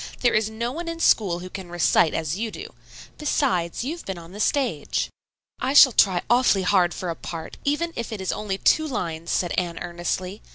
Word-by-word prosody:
"There 240 - +3
is 215 0 +2
no 230 +2 -3
one 335 +5 -6
in 335 0 -4
school 185 - +3
who 185 - -8
can 190 -3 -8
recite 170 -2 +3
as 160 0 -1
you 225 +3 -2
do; 400 - -9 0.5
besides, 235 - 0
you 290 +6 -3
have - - -10
been 190 -2 -5
on 170 0 -11
the 205 - -10
stage." 245 - 0 0.5
"I 260 +2 -1
shall 270 -2 +9
try 190 -5 +3
awfully 240 -6 +3
hard 180 -2 +3
for 180 - -4
a - - -5
part, 165 -1 -7
even 330 +4 0
if 235 - -4
it 215 - -5
is 190 - -2
only 200 -2 -3
two 315 +9 +3
lines," 170 - -4
said 175 - 0
Anne 175 -2 -4
earnestly. 180 +3 -4
195 Hz, 210 wpm, -24 LUFS, 175-250 Hz, 0.5 s, shall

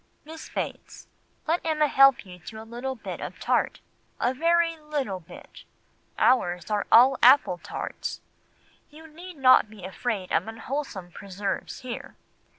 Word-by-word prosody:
Miss 320 +1 -10
Bates, - - -6 0.4
let 330 +2 0
Emma 310 -2 +1
help 275 -5 +5
you 180 -1 -12
to 220 +6 -10
a 220 - -10
little 245 +4 -5
bit 230 - -7
of - - -7
tart—a 250 - -2
very 335 +3 +2
little 295 - -4
bit. 165 - -14 0.5
Ours 180 -7 +2
are 210 -1 0
all 255 +3 +7
apple 250 -8 +6
tarts. - - -6 0.7
You 310 +2 -14
need 335 +2 -11
not 255 -5 +5
be 210 -3 -13
afraid 195 0 -4
of - - +1
unwholesome 225 -5 -5
preserves 195 +6 -5
here. 250 -2 -7
255 Hz, 140 wpm, -26 LUFS, 205-300 Hz, 0.7 s, all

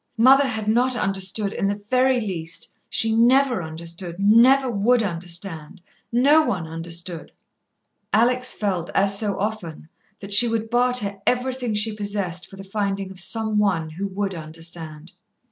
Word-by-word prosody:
Mother 265 +4 +6
had 220 -4 -4
not 245 +4 +2
understood 195 -1 -1
in 195 - -1
the 200 - 0
very 255 +5 +1
least. 175 -6 -5 0.2
She 225 0 +2
never 250 0 +3
understood, 170 +2 -7
never 235 +7 +5
would 235 +1 +2
understand. 170 -2 -3 0.3
No 280 +6 +5
one 185 - -2
understood. 165 +1 -6 0.8
Alex 250 +3 +3
felt, 185 -5 -2
as 195 0 +3
so 205 -3 -2
often, 190 -7 -5 0.3
that 200 0 -5
she 235 +4 +7
would 225 -1 -3
barter 240 -5 +1
everything 250 -2 -1
she 210 +1 +1
possessed 200 -4 -4
for - - -12
the 195 - -10
finding 195 -1 -3
of 190 - -7
some 215 +3 +2
one 175 -6 0
who 190 +6 -4
would 195 0 -3
understand. 165 0 -8
200 Hz, 145 wpm, -22 LUFS, 175-235 Hz, 0.8 s, she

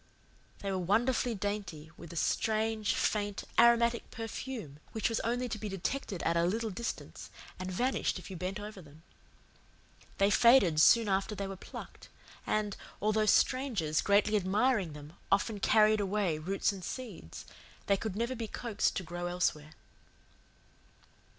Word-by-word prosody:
They 195 - -2
were 190 - -1
wonderfully 230 +6 +1
dainty, 195 -7 -4
with 170 - -11
a - - -9
strange, 220 +4 0
faint, 205 -1 -1 0.2
aromatic 235 0 +4
perfume 225 - -6
which 220 0 0
was 230 - -1
only 245 +2 -1
to 220 -1 -4
be 210 - -4
detected 195 +1 -3
at 165 - +1
a 170 - +3
little 220 +5 0
distance 230 +5 -6 0.3
and 185 0 -4
vanished 250 +6 0
if 185 0 -10
you - - -6
bent 185 +3 -4
over 210 -2 -8
them. 155 0 -17 1.1
They 200 +1 +3
faded 200 -9 +5
soon 230 +5 +6
after 195 +2 0
they 200 - -3
were 195 0 -5
plucked; - - -10 0.4
and, 210 -2 0 0.2
although 215 +1 +1
strangers, 220 - +2
greatly 205 +1 +3
admiring 205 - +1
them, 150 +1 -11 0.2
often 205 +2 +1
carried 215 +1 +4
away 195 -5 0
roots 195 +6 0
and 195 -2 -8
seeds, 210 - -7 0.4
they 200 - +3
could 200 0 -4
never 235 +4 -1
be 230 -3 -4
coaxed 230 -1 -1
to 190 - -2
grow 175 +1 -5
elsewhere. 155 -4 -1
205 Hz, 150 wpm, -31 LUFS, 180-225 Hz, 1.1 s, soon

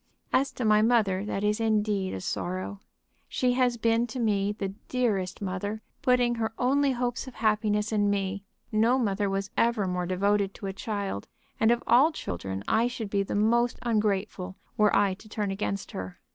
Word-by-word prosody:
"As 270 +1 +3
to 250 - -3
my 215 0 +5
mother, 215 -5 +3
that 205 -1 -3
is 210 +1 +1
indeed 210 - +1
a 95 - -5
sorrow. 185 - -3 0.5
She 250 -1 +1
has 250 -1 +2
been 230 +1 +2
to 240 +3 -6
me 205 -3 +1
the 205 -2 -3 0.2
dearest 210 -7 -1
mother, 205 +3 -3 0.2
putting 250 -3 +3
her 220 0 -1
only 275 +2 +2
hopes 245 +1 -2
of 260 - -10
happiness 210 -1 +1
in 205 -2 +2
me. 200 -1 -1 0.3
No 225 +4 +3
mother 205 -4 0
was 195 0 -2
ever 230 -3 +2
more 180 -1 -2
devoted 200 +2 +1
to - - -8
a 195 - -3
child, 200 - -4 0.3
and 220 - +4
of 240 0 +2
all 265 +7 +5
children 95 - -5
I 230 +2 +3
should 225 -4 -5
be 200 - +2
the 195 - -3
most 235 +3 +2
ungrateful 205 -4 -1 0.2
were 210 -1 +3
I 200 -1 +3
to 205 +3 -14
turn 210 -2 -2
against 195 0 -3
her. 95 -1 -6
210 Hz, 185 wpm, -28 LUFS, 195-235 Hz, 0.5 s, my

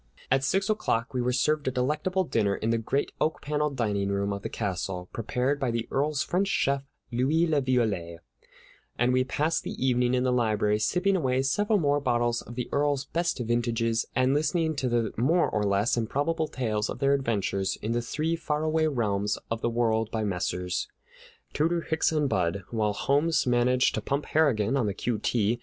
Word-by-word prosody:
At 135 0 +3
six 195 +8 +1
o'clock 130 - 0
we 125 - 0
were 125 +1 +1
served 145 +4 +1
a - - +2
delectable 150 +9 0
dinner 110 - 0
in 110 - -1
the 115 - +1
great 135 +6 -1
oak 155 - +1
paneled 150 0 -1
dining 100 -5 0
room 100 0 -1
of 100 - -5
the - - -4
castle, 90 -3 -3
prepared 125 +5 -1
by 135 -3 0
the 115 0 -2
Earl's 145 +1 0
French 190 +3 0
chef, 140 -6 +1 0.3
Louis 140 +8 +2
La 155 -3 +2
Violette; 105 -11 -1 0.8
and 125 +1 +2
we 130 0 +3
passed 150 +5 0
the - - -5
evening 125 -1 +1
in 125 - +1
the 130 - +2
library, 105 -3 +1
sipping 180 - +1
away 130 -6 +1
several 205 +10 +2
more 145 -5 +2
bottles 120 -3 0
of 120 - -11
the 125 -1 -3
Earl's 145 -1 +1
best 170 +4 -1
vintages 115 -1 0
and 130 +1 +3
listening 160 +2 +1
to 130 -3 0
the 120 -2 0
more 160 +10 +3
or 105 - -1
less 100 +2 +2
improbable 145 +8 -1
tales 110 -6 -2
of - - -4
their 140 0 +2
adventures 100 -7 -1
in 110 - -1
the 120 +1 0
three 155 +7 -1
faraway 155 0 0
realms 105 -7 0
of 115 0 -2
the 120 - +1
world 115 -2 +1
by 110 -1 -2
Messrs. 90 -2 -2 0.7
Tooter, 165 +3 +1
Hicks, 160 -1 0
and 150 -2 +1
Budd, 95 -3 0
while 110 -3 0
Holmes 145 +9 +1
managed 125 +1 +3
to - - -2
pump 140 +1 -2
Harrigan 135 -7 +2
on 120 -6 +1
the 100 - -2
Q. 120 -3 -2
T. 115 0 0
125 Hz, 190 wpm, -27 LUFS, 110-145 Hz, 0.8 s, At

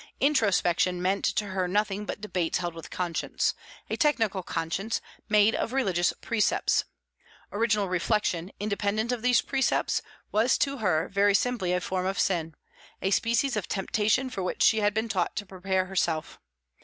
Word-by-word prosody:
Introspection 185 - +2
meant 190 +2 0
to 210 - 0
her 185 -1 -1
nothing 205 +1 0
but - - -4
debates 180 -6 -1
held 175 -2 -3
with 165 0 -9
conscience 175 -3 -1 0.3
a - - -2
technical 225 - +1
conscience, 180 +6 -2 0.3
made 210 +1 +5
of 235 - -2
religious 190 -10 +2
precepts. 230 -3 +1 0.7
Original 210 -1 +1
reflection, 185 -1 0
independent 210 +2 -1
of 245 -2 -2
these 245 0 +3
precepts, 270 -1 +1 0.3
was 225 +4 +3
to 275 0 0
her 180 -5 +1
very 200 0 +3
simply 225 -6 0
a 180 - +2
form 185 +1 -2
of 195 - -2
sin, 165 -4 0 0.4
a 190 - -1
species 235 +5 +2
of 210 -4 -2
temptation 215 +6 +1
for 195 - -4
which 180 - -1
she 220 - +5
had 205 -1 +1
been 220 +1 0
taught 190 -6 -1
to 205 - -3
prepare 190 0 -1
herself. 170 -4 -2
200 Hz, 160 wpm, -27 LUFS, 180-220 Hz, 0.7 s, made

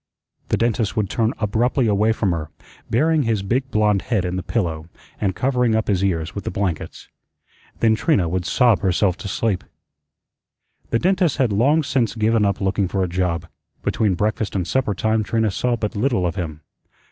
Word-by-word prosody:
The - - +2
dentist 115 -3 0
would 105 -3 0
turn 115 0 +1
abruptly 115 +5 +1
away 105 +1 +2
from 105 -4 0
her, 80 -3 -3 0.4
burying 155 +6 +2
his 115 -6 0
big 130 +6 -1
blond 105 -3 +2
head 105 -7 -1
in 90 0 -2
the 95 - -2
pillow, 85 -7 -2 0.3
and 95 -3 0
covering 125 -3 +1
up 110 - 0
his 95 -2 +1
ears 85 -4 -1
with 100 - -5
the - - -3
blankets. 95 -5 -3 0.7
Then 110 -1 +4
Trina 110 - +2
would 90 +2 -1
sob 120 -6 +3
herself 95 0 +1
to 100 - -7
sleep. 100 0 -1 1.3
The 115 - +2
dentist 180 - +1
had 125 -7 +2
long 140 +10 +3
since 125 -6 0
given 110 -1 +2
up 100 -1 0
looking 95 0 0
for 95 +1 -1
a - - 0
job. 85 -2 -1 0.4
Between 105 -4 +1
breakfast 105 +2 -1
and 90 -3 -1
supper 125 -4 0
time 110 +2 +1
Trina 110 0 0
saw 120 +5 0
but 110 -2 -3
little 115 -3 +1
of 85 0 -1
him. 80 -4 -5
105 Hz, 185 wpm, -21 LUFS, 95-115 Hz, 1.3 s, Then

